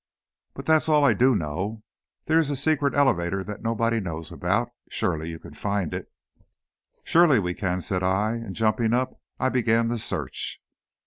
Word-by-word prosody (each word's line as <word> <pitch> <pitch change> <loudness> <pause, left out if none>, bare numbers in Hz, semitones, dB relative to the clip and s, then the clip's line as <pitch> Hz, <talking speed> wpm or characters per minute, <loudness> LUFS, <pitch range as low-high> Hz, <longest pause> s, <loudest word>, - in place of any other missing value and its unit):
"But - - -8
that's 160 0 +3
all 150 -2 +5
I - - +5
do 130 0 +4
know. 95 +6 -3 0.4
There 160 +1 +4
is 155 -3 +1
a 145 - -1
secret 140 0 +1
elevator 95 -9 +2
that 105 +1 -7
nobody 115 0 0
knows 80 -5 -5
about. - - 0 0.2
Surely 80 0 -1
you 80 - -6
can 80 -1 -13
find 100 0 -2
it." - - -6 0.9
"Surely 165 -5 +5
we 90 -4 0
can!" 90 -1 -2
said 90 +3 -2
I, 95 +4 +1
and 115 -5 -5
jumping 110 +1 +1
up, 130 +1 -2 0.2
I 130 - +2
began 115 -2 +2
the 120 -1 -1
search. - - -3
110 Hz, 175 wpm, -25 LUFS, 95-130 Hz, 0.9 s, all